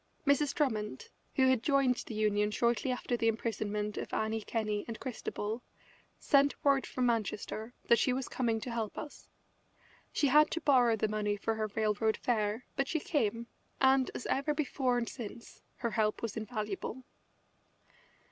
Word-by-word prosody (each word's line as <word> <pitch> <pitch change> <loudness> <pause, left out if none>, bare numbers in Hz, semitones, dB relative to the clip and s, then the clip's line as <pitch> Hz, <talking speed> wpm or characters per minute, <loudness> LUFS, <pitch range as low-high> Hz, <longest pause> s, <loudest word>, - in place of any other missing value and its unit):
Mrs. 285 0 +3
Drummond, 215 - -1 0.3
who 260 -1 +4
had 260 -3 +3
joined 275 -2 +3
the 225 - -6
Union 210 -1 +2
shortly 235 +3 +1
after 250 0 -1
the 230 -1 +1
imprisonment 210 -2 -1
of - - -6
Annie 220 0 0
Kenney 210 -1 -2
and 230 -1 -6
Christabel, 225 -3 -4 0.6
sent 280 0 +3
word 275 -1 +4
from 255 - -1
Manchester 225 0 -2
that 235 - +5
she 255 - +3
was 260 +1 -2
coming 230 -3 0
to 245 - -5
help 225 -3 -3
us. 295 - -8 0.8
She 295 - +1
had 300 +3 +6
to 335 - -2
borrow 250 -6 +5
the 215 0 0
money 210 -1 -1
for 225 +2 -1
her 220 -1 -1
railroad 220 0 +1
fare, 220 0 0
but 275 0 0
she 320 - 0
came, 235 - 0 0.3
and, 265 -1 +4
as - - -5
ever 285 +2 0
before 265 -4 0
and 235 -1 -1
since, 230 -1 -8
her 235 -2 -2
help 215 0 0
was 225 -3 -3
invaluable. 215 +2 -4
230 Hz, 165 wpm, -32 LUFS, 215-260 Hz, 0.8 s, had